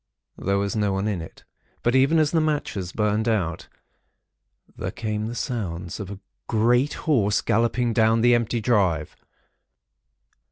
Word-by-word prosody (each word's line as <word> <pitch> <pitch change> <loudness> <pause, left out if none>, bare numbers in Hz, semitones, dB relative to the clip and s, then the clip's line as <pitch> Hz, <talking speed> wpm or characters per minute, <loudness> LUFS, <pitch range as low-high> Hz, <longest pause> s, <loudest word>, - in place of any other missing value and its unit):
There 100 +1 0
was 100 +1 -1
no 105 -2 +1
one 95 +2 -1
in 100 -5 -2
it; 80 - -11 0.4
but 120 - +2
even 135 +5 +4
as 155 -2 +3
the 165 - +2
matches 145 - -2
burned 105 +2 0
out, 90 -7 -1 1.1
there - - -4
came 110 -1 -3
the 120 - -5
sounds 95 - -4
of 100 -3 -6
a 100 - -7 0.3
great 120 +5 +2
horse 105 -9 +2
galloping 115 +2 +1
down 110 0 +3
the 120 +1 +5
empty 120 0 +1
drive. 95 -10 +1
110 Hz, 150 wpm, -24 LUFS, 100-120 Hz, 1.1 s, the